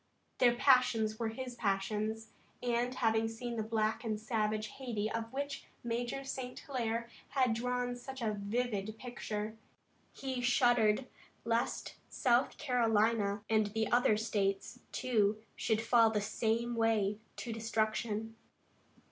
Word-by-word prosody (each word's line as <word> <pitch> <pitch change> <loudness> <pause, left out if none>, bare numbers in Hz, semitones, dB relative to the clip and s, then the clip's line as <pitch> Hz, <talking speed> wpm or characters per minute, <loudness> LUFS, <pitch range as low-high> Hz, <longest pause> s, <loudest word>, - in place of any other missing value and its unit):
Their 240 -1 +5
passions 240 -5 +4
were 230 - 0
his 250 +2 -5
passions, 215 +1 -1 0.3
and 245 +1 0
having 225 -2 +2
seen 235 +1 -5
the 225 - -1
black 220 0 0
and 215 -2 -1
savage 215 -1 -1
Hayti 220 -5 -2
of 230 0 -3
which 280 +1 -4 0.2
Major 240 +3 -2
St. 260 -2 -5
Hilaire 235 -4 -2 0.2
had 255 -4 +2
drawn 245 +1 -1
such 265 +2 -8
a 220 -3 0
vivid 210 0 -2
picture, 220 -3 -4 0.5
he 260 -2 -4
shuddered 240 -1 +4 0.4
lest 230 +1 -1
South 245 +1 +2
Carolina 225 -4 +2
and 215 -2 +2 0.2
other 240 -3 +4
states, 205 +1 -1
too, 220 -5 +2 0.2
should 220 -1 0
fall 230 -1 +6
in 220 - 0
the 210 - +1
same 225 +3 0
way 215 -3 +2 0.2
to 235 - -4
destruction. 220 0 -1
225 Hz, 130 wpm, -34 LUFS, 215-245 Hz, 0.5 s, fall